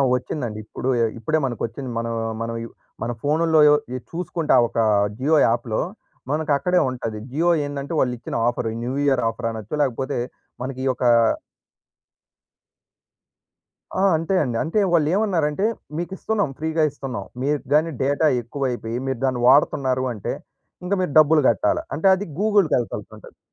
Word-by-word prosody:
వచ్చిందండి. 125 -4 -4
ఇప్పుడు 130 - -4
ఎ - - +4
ఇప్పుడే 155 +8 0
మనకొచ్చింది. 120 +1 -4
మనం 115 0 -2 0.3
మనం 115 0 -3
యు 115 - -7 0.3
మన 115 - -1
ఫోన్నులో 160 +2 +2
యో 150 - +7 0.2
ఇ - - -1
చూసుకుంటా 165 -2 0
ఒక - - -9 0.4
జియో 145 +5 +2
యాప్‌లో, 115 -1 0 0.5
మనకు 155 0 -1
అక్కడే 180 +6 +2
ఉంటది. 115 -4 -4
జియో 165 +5 +1 0.2
ఏందంటే, 145 +2 -5
వాళ్ళు 125 -1 +1
ఇచ్చిన - - -7
ఆఫరు 120 -1 -1
న్యూ 125 +2 -2
ఇయర్ 135 -3 +2
ఆఫర్ 115 +1 -4
అనొచ్చు. 110 0 -7
లేకపోతే 135 +1 -1 0.4
మనకి 130 +1 -5
ఈ 135 - 0
యొకా 125 -1 +2 2.9
ఆ! - - +2
అంతే 165 +4 0
అండి. 120 -4 -2
అంటే 165 +7 0
వాళ్ళు 155 -3 +3
ఏమన్నారంటే, 190 -4 +1 0.3
మీకు 175 +2 -4
ఇస్తున్నాం. 210 -7 -1
ఫ్రీగా 160 +1 0
ఇస్తున్నాం. 135 -2 -6 0.2
మీరు 145 +2 +1
గాని 155 +2 +3
డేటా 145 +4 +1 0.2
ఎక్కువైపోయి, 120 -2 -3
మీరు 130 -3 -2
దాన్ని 130 -2 0
వాడుతున్నారు 130 -1 +3
అంటే, 105 - -4 0.5
ఇంక 180 +3 -1
మీరు 180 - -1
డబ్బులు 155 0 +6
గట్టాల. - - +1
అంటే 160 +7 +1
అది 200 +2 -5
గూగుల్‌కి 205 -5 +3
యేళ్తుంటా‌ది. 120 - -6
140 Hz, 150 wpm, -22 LUFS, 120-160 Hz, 2.9 s, యో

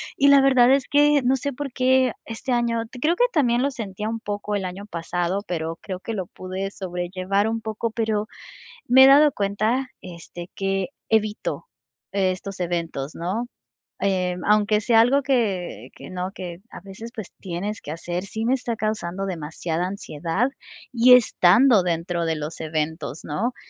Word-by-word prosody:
y 280 0 +4
la 280 -1 +8
verdad 260 -2 +5
es 275 -2 +2
que 290 0 +4
no 260 +2 +3
sé 280 +2 -3
por 275 0 -6
qué 260 -1 +3
este 230 +3 -4
año 235 -1 +1 0.2
creo 330 +3 +3
que - - +5
también 245 -6 +2
lo 280 +1 +1
sentía 210 -4 -5
un 225 +1 -3
poco 205 0 -3
el 200 - -1
año 185 +3 -6
pasado, 175 +1 -2
pero 165 -2 -3
creo 185 -3 -6
que 225 - -5
lo 190 -5 -3
pude 190 +2 -5
sobrellevar 185 +2 -2
un 225 0 -2
poco, 220 +1 -3
pero 220 -2 -1 0.6
me 260 +2 +8
he - - +8
dado 290 +2 +7
cuenta, 215 +5 0
este, 175 0 -9
que 195 +2 -1 0.2
evito 215 - -1 0.5
estos 190 0 -1
eventos, 170 -5 -3
¿no?, 195 +8 -3 0.5
eh, 185 -2 0
aunque 210 0 +3
sea 225 +1 +4
algo 265 +5 +4
que 220 -10 -1
que - - -10
no 185 0 -3
que 175 -3 -7
a - - -10
veces, 195 +5 -9
pues, 220 -6 -8
tienes 195 +4 -4
que - - -9
hacer, 175 +3 -4
sí 220 +3 -4
me 245 +3 +3
está 245 -3 -3
causando 195 -4 -2
demasiada 165 0 -3
ansiedad 185 - -2 0.4
y 250 +1 +7
estando 230 -1 +5
dentro 170 0 -1
de 165 -1 0
los 150 +2 -6
eventos, 155 -2 -3
¿no?, 225 +12 -2
205 Hz, 170 wpm, -23 LUFS, 180-240 Hz, 0.6 s, la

